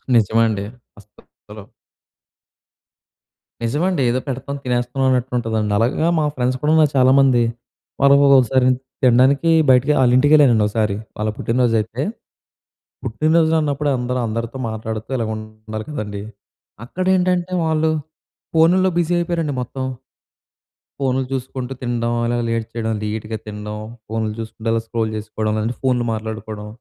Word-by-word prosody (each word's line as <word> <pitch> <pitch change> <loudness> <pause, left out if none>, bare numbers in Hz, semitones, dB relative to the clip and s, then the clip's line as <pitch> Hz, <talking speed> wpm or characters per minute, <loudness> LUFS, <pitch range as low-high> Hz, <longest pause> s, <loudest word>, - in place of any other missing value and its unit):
నిజమండి. 110 -2 +2 0.3
అస‌సలు 105 0 -16 2.0
నిజమండి. 150 +7 0
ఏదో 125 +2 +1
పెడతాం, 135 +1 -4
తినేస్తున్నాం 125 +1 -1
అన్నట్టు 130 0 0
ఉంటుందండి. 110 -3 -1
అలాగ 125 +9 +1
మా 155 - +1
ఫ్రెండ్స్ 130 0 0
కూడా‌నా 155 +1 +4
చాలామంది. 130 -1 +5 0.6
వాళ్ళు 140 0 +6 0.2
ఒకసారి 130 +1 +2 0.4
తినడానికి 130 +5 +4 0.2
బయటికి 130 +3 +5
ఆళ్ళ 125 -2 +4
ఇంటికి 145 +3 +3
వెళ్ళానండి 125 -8 +5
ఒకసారి. 105 -1 0 0.2
వాళ్ళ 110 0 -1
పుట్టినరో‌జు 120 -1 +1
అయితే, 115 +4 -6 1.0
పుట్టినరోజులు 160 +6 +2
అన్నప్పుడే 145 -1 0
అందరూ 125 +1 -2
అందరితో 115 +3 -4
మాట్లాడుతూ 110 0 -5
ఇలాగ 115 -2 -2
ఉండాలి 110 0 -8
కదండీ. 105 -7 -5 0.6
అక్కడేంటంటే 185 +2 0
వాళ్ళు, 160 0 +1 0.6
ఫోనుల్లో 180 +4 +4
బిజీ 175 0 0
అయిపోయారండి 170 -3 -1
మొత్తం. 130 +2 -5 1.2
ఫోన్‌లు 130 -1 0
చూసుకుంటూ 130 -1 -4
తినడం, 120 -1 -1
అల‌గా 120 0 0
లేట్ 115 -1 -1
చేయడం. 110 -1 -2
లెట్‌గా 110 +1 -4
తినడం. 105 0 -6 0.3
ఫోన్‌లు 110 -1 -2
చూసుకుంటూ 110 0 -5
అలా 115 - +1
స్క్రోల్ 115 -1 -2
చేసుకోవడం, 110 0 -3
లేదంటే 115 +3 -2
ఫోన్‌లు 125 -2 +1
మాట్లాడుకోవడం. 110 -1 -6
120 Hz, 120 wpm, -20 LUFS, 110-140 Hz, 2.0 s, వాళ్ళు